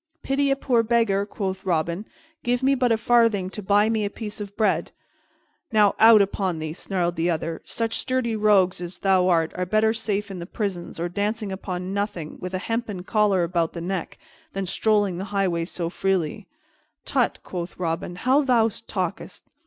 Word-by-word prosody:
"Pity 275 Hz, +1 st, +1 dB
a 275 Hz, -, +3 dB
poor 255 Hz, -4 st, +2 dB
beggar," 220 Hz, -4 st, +1 dB
quoth 190 Hz, -2 st, -4 dB
Robin. 170 Hz, +2 st, -1 dB, 0.3 s
"Give 245 Hz, +1 st, 0 dB
me 270 Hz, +1 st, +4 dB
but 250 Hz, -3 st, +2 dB
a 225 Hz, -, +4 dB
farthing 225 Hz, -5 st, +3 dB
to 210 Hz, -, -6 dB
buy 205 Hz, +2 st, +3 dB
me 220 Hz, -1 st, +1 dB
a 205 Hz, -, -1 dB
piece 210 Hz, 0 st, -7 dB
of 200 Hz, -1 st, -8 dB
bread." 215 Hz, -1 st, +1 dB, 0.8 s
"Now, 210 Hz, -2 st, +4 dB
out 220 Hz, -2 st, +8 dB
upon 190 Hz, -3 st, -2 dB
thee!" 155 Hz, 0 st, -4 dB
snarled 175 Hz, -1 st, -2 dB
the 165 Hz, +2 st, 0 dB
other. 165 Hz, 0 st, -2 dB
"Such 225 Hz, -1 st, -2 dB
sturdy 255 Hz, -3 st, -1 dB
rogues 200 Hz, -4 st, +3 dB
as 175 Hz, +1 st, -5 dB
thou 185 Hz, -2 st, +3 dB
art 165 Hz, -2 st, +2 dB
are 180 Hz, -, -2 dB
better 215 Hz, +4 st, +2 dB
safe 210 Hz, -2 st, -2 dB
in 185 Hz, -, -6 dB
the 170 Hz, -, -7 dB
prisons 185 Hz, -6 st, -4 dB
or 170 Hz, -, -1 dB
dancing 205 Hz, +3 st, -2 dB
upon 185 Hz, -1 st, -4 dB
nothing, 200 Hz, -6 st, -3 dB
with 185 Hz, +1 st, -4 dB
a 185 Hz, -, -4 dB
hempen 225 Hz, -5 st, -3 dB
collar 205 Hz, -3 st, +2 dB
about 170 Hz, -1 st, 0 dB
the 170 Hz, -, -5 dB
neck, 180 Hz, 0 st, -4 dB, 0.4 s
than 195 Hz, 0 st, -2 dB
strolling 205 Hz, -1 st, +1 dB
the 190 Hz, -, -3 dB
highways 185 Hz, -4 st, -1 dB
so 170 Hz, -2 st, -3 dB
freely." 180 Hz, -3 st, -1 dB, 0.6 s
"Tut," -, -, +1 dB
quoth 175 Hz, -1 st, -6 dB
Robin, 175 Hz, 0 st, -3 dB
"how 260 Hz, +10 st, +3 dB
thou 240 Hz, -5 st, +3 dB, 0.2 s
talkest! -, -, -4 dB
195 Hz, 185 wpm, -24 LUFS, 180-220 Hz, 0.8 s, out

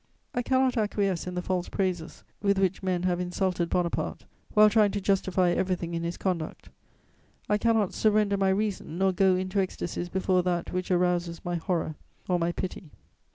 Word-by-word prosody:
I 245 Hz, -, 0 dB
cannot 260 Hz, 0 st, +2 dB
acquiesce 200 Hz, -5 st, 0 dB
in 180 Hz, -, -4 dB
the 180 Hz, -, -2 dB
false 180 Hz, -1 st, -1 dB
praises 180 Hz, -4 st, -2 dB, 0.2 s
with 200 Hz, -1 st, +2 dB
which 190 Hz, -1 st, +1 dB
men 185 Hz, -2 st, -1 dB
have 180 Hz, -1 st, +1 dB
insulted 180 Hz, -1 st, -1 dB
Bonaparte, 175 Hz, -1 st, -1 dB, 0.3 s
while 215 Hz, 0 st, +8 dB
trying 210 Hz, -1 st, +4 dB
to 205 Hz, -, -1 dB
justify 190 Hz, -2 st, +2 dB
everything 180 Hz, -2 st, -1 dB
in 165 Hz, -, -2 dB
his 170 Hz, +1 st, -3 dB
conduct; 175 Hz, -5 st, -3 dB, 0.8 s
I 210 Hz, -, +2 dB
cannot 225 Hz, -3 st, +2 dB
surrender 210 Hz, -2 st, +2 dB
my 195 Hz, -1 st, +2 dB
reason 190 Hz, -4 st, -1 dB
nor 190 Hz, 0 st, +3 dB
go 190 Hz, 0 st, +3 dB
into 185 Hz, +2 st, -1 dB
ecstasies 175 Hz, -2 st, -3 dB
before 185 Hz, 0 st, +1 dB
that 175 Hz, -1 st, -2 dB
which 185 Hz, 0 st, -2 dB
arouses 175 Hz, -2 st, 0 dB
my 175 Hz, -, -2 dB
horror 165 Hz, -1 st, -1 dB, 0.3 s
or 180 Hz, -1 st, +1 dB
my 170 Hz, 0 st, +1 dB
pity. 180 Hz, -1 st, -5 dB
185 Hz, 175 wpm, -27 LUFS, 175-200 Hz, 0.8 s, while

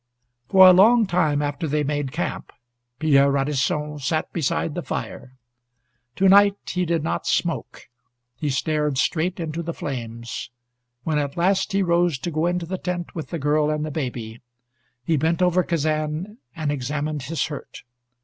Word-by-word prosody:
For 190 Hz, -1 st, +8 dB
a 185 Hz, -, +9 dB
long 220 Hz, +5 st, +6 dB
time 155 Hz, -6 st, +1 dB
after 145 Hz, +3 st, -2 dB
they 150 Hz, +1 st, 0 dB
made 145 Hz, -2 st, -2 dB
camp -, -, -4 dB, 0.5 s
Pierre 140 Hz, -2 st, +4 dB
Radisson 145 Hz, +2 st, -1 dB
sat 155 Hz, +3 st, -2 dB
beside 160 Hz, -1 st, -1 dB
the 175 Hz, -, -3 dB
fire. 130 Hz, -5 st, -6 dB, 0.8 s
To 195 Hz, -, +3 dB
night 200 Hz, +1 st, +6 dB
he 180 Hz, 0 st, -1 dB
did 165 Hz, -2 st, 0 dB
not 160 Hz, -, -2 dB
smoke. 165 Hz, -7 st, -2 dB, 0.5 s
He 145 Hz, +4 st, -3 dB
stared 150 Hz, +1 st, 0 dB
straight 175 Hz, +6 st, 0 dB
into 165 Hz, 0 st, -3 dB
the 170 Hz, 0 st, -5 dB
flames. 120 Hz, -4 st, -5 dB, 0.5 s
When 155 Hz, -2 st, 0 dB
at 140 Hz, +1 st, -3 dB
last 190 Hz, +3 st, +1 dB
he 195 Hz, 0 st, +2 dB
rose 170 Hz, -3 st, +2 dB
to 170 Hz, +7 st, -4 dB
go 155 Hz, +2 st, 0 dB
into 175 Hz, -1 st, -1 dB
the 185 Hz, +2 st, -4 dB
tent 180 Hz, -1 st, -4 dB
with 160 Hz, -, -5 dB
the 170 Hz, -, -3 dB
girl 150 Hz, 0 st, +1 dB
and 150 Hz, 0 st, -1 dB
the 155 Hz, -, -5 dB
baby, 120 Hz, -6 st, -5 dB, 0.6 s
he 160 Hz, +1 st, +2 dB
bent 160 Hz, +3 st, +1 dB
over 180 Hz, 0 st, +3 dB
Kazan 155 Hz, -, -2 dB, 0.2 s
and 155 Hz, -3 st, -2 dB
examined 145 Hz, +2 st, -3 dB
his 150 Hz, +5 st, -2 dB
hurt. 145 Hz, -2 st, -8 dB
155 Hz, 165 wpm, -23 LUFS, 145-175 Hz, 0.8 s, a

